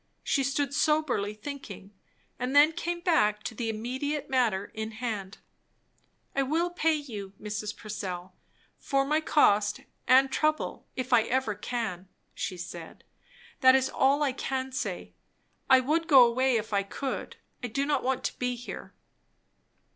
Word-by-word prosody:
She 275 - +1
stood 280 +1 -1
soberly 290 -9 +1
thinking, 210 -6 -8 0.5
and 250 +3 -2
then 295 +2 +7
came 345 +1 -3
back 215 - +2
to - - -4
the 225 +1 -3
immediate 260 +7 -3
matter 225 -7 +1
in 220 0 -5
hand. 215 -4 -4 1.0
"I 275 - +2
will 325 +6 0
pay 325 -2 +2
you, 215 -10 -6
Mrs. 210 0 -4
Purcell, 185 -4 -6 0.4
for 275 -1 +1
my 305 +3 +1
cost 210 -9 +3 0.3
and 265 +1 +6
trouble, 310 +3 -1
if 255 -1 -2
ever 245 +1 +3
I - - -15
can," 205 -6 -3 0.3
she 185 - -4
said. 170 -1 -9 0.6
"That 260 -1 +7
is 265 0 +2
all 280 +3 +3
I 280 - +2
can 265 0 -3
say. 260 - -4 0.6
I 260 -1 +7
would 320 +5 0
go 265 -5 +8
away, 255 +2 +2
if 220 -1 -5
I 200 - +3
could. 265 +7 -5 0.3
I - - -1
do 275 +5 -1
not 295 0 +1
want 260 0 -1
to - - -3
be 250 0 -1
here." 245 0 -9
255 Hz, 155 wpm, -28 LUFS, 215-280 Hz, 1.0 s, go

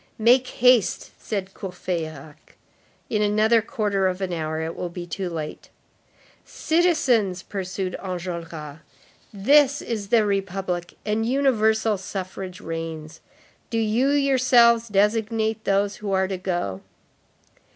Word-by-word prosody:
"Make 245 +3 +4
haste," 245 -8 +3
said 195 -3 -4
Courfeyrac, 160 -6 -6 0.5
"in 210 -2 0
another 215 +2 +3
quarter 205 -3 0
of 185 0 -2
an 190 -2 -3
hour 155 -1 -3
it 160 +1 -4
will 180 - -4
be 175 0 -7
too 180 +2 -4
late." 155 -3 -6 0.7
"Citizens," 265 - +1
pursued 190 -1 -4
Enjolras, 170 -5 -6 0.5
"this 280 +7 +4
is 215 -4 -4
the 220 0 +3
Republic, 190 -3 -2
and 220 +1 0
universal 220 -5 +2
suffrage 185 -1 -6
reigns. 165 -1 -6 0.5
Do 230 - -2
you 225 +4 +2
yourselves 255 -5 +4
designate 220 +1 0
those 200 +1 +1
who 205 -2 -5
are 190 0 +2
to 190 -1 -3
go." 175 - -3
200 Hz, 120 wpm, -24 LUFS, 180-225 Hz, 0.7 s, Make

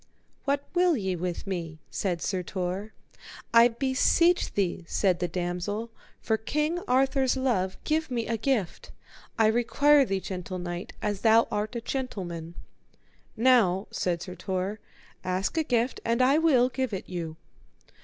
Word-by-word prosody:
What 280 -1 +1
will 350 -3 +3
ye 190 -4 -1
with 175 0 -4
me? 170 -5 -4
said 180 -4 -2
Sir 185 -2 -1
Tor. 185 +3 -4 0.6
I 230 +1 +8
beseech 270 +8 +2
thee, 185 -3 -1
said 185 -2 +1
the 180 - 0
damosel, 180 +6 -3 0.3
for 220 - 0
King 300 +9 -1
Arthur's 265 +1 +2
love, 210 -8 0
give 315 0 0
me 235 -3 -2
a 230 - -1
gift; 225 -5 -1 0.5
I 225 - +4
require 275 +6 +4
thee, 195 -6 -1
gentle 185 -1 -5
knight, 175 0 -5
as 205 -2 -1
thou 225 0 +5
art 210 +3 -2
a 235 - -2
gentleman. 175 -11 -5 0.8
Now, 220 -6 +4
said 175 -2 -1 0.2
Tor, 190 +3 -2 0.4
ask 185 - -1
a 320 - +2
gift 245 -3 0
and 230 +1 0
I 265 +4 +4
will 265 -7 +4
give 260 -3 -2
it 190 - -4
you. 165 -3 -5
220 Hz, 145 wpm, -27 LUFS, 185-260 Hz, 0.8 s, I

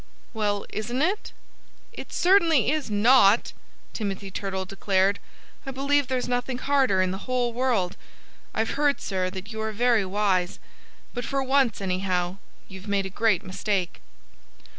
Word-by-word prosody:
"Well, 205 -2 -1
isn't 240 +6 -2
it?" 390 +6 -1 0.6
"It - - -9
certainly 335 - +4
is 305 -5 -2
not," 215 0 +5 0.4
Timothy 200 -2 -4
Turtle 190 -1 -3
declared. 195 +1 +1 0.4
"I 270 - -6
believe 280 +1 +1
there's 255 -1 -1
nothing 245 +1 -1
harder 255 -8 +2
in 185 - -1
the 190 +6 -7
whole 245 -2 0
world.... 230 -8 0 0.5
I've 225 +1 -1
heard, 290 0 +1
sir, 185 -2 -2
that 190 +3 -8
you 220 - -4
are 220 0 -2
very 235 0 +2
wise. 190 -2 0 0.6
But 245 - -4
for 275 +2 -1
once, 265 -5 +2
anyhow, 185 -1 -1 0.3
you've 190 +1 -11
made 200 -1 0
a 190 - -6
great 215 -2 +1
mistake." 190 -1 -2
215 Hz, 145 wpm, -25 LUFS, 190-255 Hz, 0.6 s, not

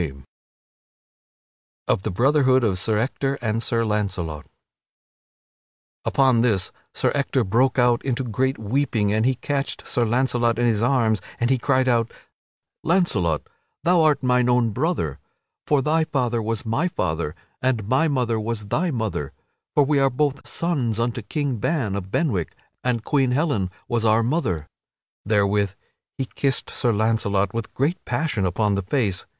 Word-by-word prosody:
[Sidenote: 70 -5 -5 1.6
Of - - +2
the - - -3
brotherhood 130 +4 +3
of 95 -5 +1
Sir 110 +2 +1
Ector 135 +4 -1
and 115 -2 -1
Sir 115 -1 0
Launcelot] 95 -8 -2 1.6
Upon 130 -4 +3
this 105 -6 +1 0.2
Sir - - 0
Ector 140 -2 +1
broke 120 +7 +2
out 120 -1 +3
into 130 -1 -1
great 130 +3 -1
weeping 110 -2 0
and 110 +3 +2
he 130 - +2
catched 140 +2 -3
Sir 120 - 0
Launcelot 120 0 +1
in 120 - +2
his 110 -3 +2
arms 115 -5 +2 0.2
and 120 +2 +1
he 130 - +2
cried 130 0 +2
out: 115 -2 +2 0.7
"Launcelot, 110 - +1 0.4
thou 175 0 +4
art 150 -3 +3
mine 125 -1 +3
own 120 -2 +3
brother! 125 - -1 0.5
For 145 -3 +3
thy 160 +2 +2
father 125 -6 0
was 110 0 -3
my 115 +10 0
father, 85 - -2 0.3
and 120 -6 0
my 130 +8 +3
mother 125 -6 0
was 105 -2 -4
thy 175 - +1
mother! 110 - -3 0.4
For 145 - +6
we 145 0 +2
are 135 0 +4
both 140 +1 -1
sons 130 -10 -1
unto 120 +1 -1
King 135 +4 -2
Ban 110 -5 -1
of 95 -2 -5
Benwick, 105 - -1 0.3
and 120 -3 0
Queen 135 -4 +2
Helen 135 - 0 0.2
was 120 -1 0
our 110 +1 +4
mother." 115 - -1 0.6
Therewith 100 -2 +2 0.4
he 135 - -1
kissed 135 +1 -1
Sir 120 - 0
Launcelot 105 -3 +1
with 115 -1 -4
great 155 +8 0
passion 120 -6 -1
upon 105 +4 +1
the 100 - 0
face. 100 -2 -1
120 Hz, 155 wpm, -23 LUFS, 105-135 Hz, 1.6 s, For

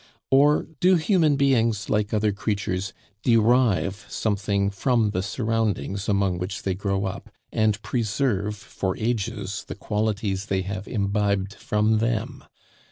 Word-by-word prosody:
or, 145 +3 +5 0.2
do 185 0 +5
human 160 -3 +3
beings, 115 -6 +2
like 105 0 0
other 105 -1 +2
creatures, 100 -2 -2 0.3
derive 115 -4 +3
something 100 -1 0
from 110 +1 +1
the 95 - -1
surroundings 105 - -1
among 100 -3 +1
which 95 +4 -4
they 95 - 0
grow 100 +1 -1
up, 95 - -5 0.2
and 110 -1 +1
preserve 110 -3 0
for 95 -2 -4
ages 105 -3 -2
the - - -6
qualities 105 -1 -2
they 95 -1 0
have 100 +1 -5
imbibed 100 -2 0
from 110 -2 +1
them? 115 +4 -2
105 Hz, 130 wpm, -24 LUFS, 100-115 Hz, 0.3 s, or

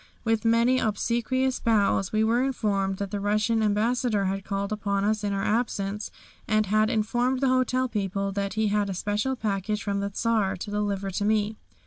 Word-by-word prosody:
With 225 0 0
many 235 +3 +4
obsequious 240 +4 0
bows 205 -4 +2
we 215 0 +2
were 230 +3 +2
informed 200 -7 0
that 200 0 -4
the 205 - -2
Russian 215 +3 +1
Ambassador 215 0 +1
had 195 +1 -2
called 200 +1 -3
upon 200 -2 -1
us 215 +1 0
in 205 - 0
our 195 0 -1
absence, 210 -2 -1 0.4
and 215 0 +2
had 215 +2 +2
informed 240 +3 0
the 270 -1 +2
hotel 255 0 +2
people 195 -3 -2
that 200 +1 -3
he 220 -1 +1
had 205 -1 +1
a 190 - -3
special 210 +7 -1
package 210 -2 -2
from 200 -1 -1
the 200 0 -2
Czar 210 -2 0
to 205 +3 -6
deliver 200 -2 -1
to 195 - -2
me. 215 0 +1
210 Hz, 185 wpm, -26 LUFS, 200-230 Hz, 0.4 s, many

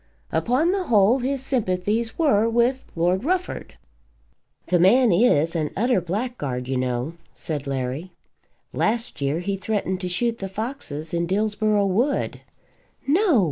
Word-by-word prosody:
Upon 250 - +2
the 380 -1 -1
whole 220 - +4
his 265 +1 -2
sympathies 220 -1 -1
were 230 -9 +3
with 240 +3 +1
Lord 175 +4 +1
Rufford. 365 +4 -2 0.9
"The 180 - +2
man 225 +6 +5
is 170 -5 +3
an 155 -2 0
utter 235 -2 +2
blackguard, 175 - -3
you 135 - -1
know," 125 +3 -1 0.2
said 150 -3 -4
Larry. 135 +6 -3 0.6
"Last 230 - -1
year 140 +4 0
he 200 +2 -2
threatened 195 -1 -2
to 180 - -3
shoot 230 +6 0
the 195 - -4
foxes 190 - -5
in 170 0 0
Dillsborough 210 +1 +1
Wood." 235 +9 0 0.6
"No!" 325 - +3
205 Hz, 140 wpm, -23 LUFS, 170-245 Hz, 0.9 s, man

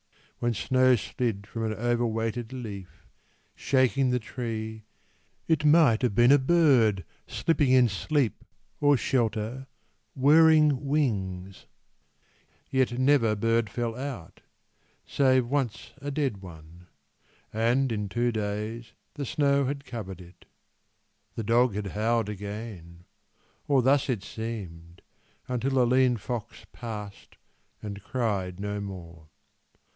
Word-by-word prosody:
When 120 -1 0
snow 130 +4 +3
slid 115 -3 -3
from 115 +1 -5
an 110 - -1
overweighted 115 0 -1
leaf, 105 -8 -8 0.5
Shaking 130 0 +2
the 125 - +2
tree, 110 -2 -5 0.6
it 160 -2 +2
might 150 -7 +5
have 120 -6 0
been 120 +3 +5
a 145 - +7
bird 130 - +3 0.2
Slipping 155 -5 +1
in 130 -1 +6
sleep 120 - -1 0.4
or 145 -1 +4
shelter, 120 +2 -1 0.5
whirring 150 0 +5
wings; 95 -10 -2 1.0
Yet 130 -2 +1
never 130 -5 +3
bird 115 +1 +1
fell 115 +1 -3
out, 130 -10 -7 0.6
save 130 -2 +2
once 130 -3 -3
a 145 - -4
dead 140 -6 -1
one 85 -1 -13 0.7
And 120 +4 +1
in 105 -2 -3
two 120 +3 0
days 110 +2 -4 0.2
the 145 -2 -5
snow 140 -2 +2
had 140 +1 -4
covered 100 -7 -7
it. 90 +1 -16 0.9
The 115 - -3
dog 115 0 +2
had 105 0 -3
howled 110 0 0
again 100 -4 -8 0.6
or 135 -3 +3
thus 140 +2 +3
it 115 -6 -1
seemed 90 -8 -7 0.4
Until 125 +2 -1
a 125 - +5
lean 125 0 +3
fox 115 +2 -6
passed 105 -4 -8 0.5
and 100 -1 -6
cried 100 -6 -2
no 105 0 -3
more. 85 -5 -9
115 Hz, 120 wpm, -27 LUFS, 105-130 Hz, 1.0 s, a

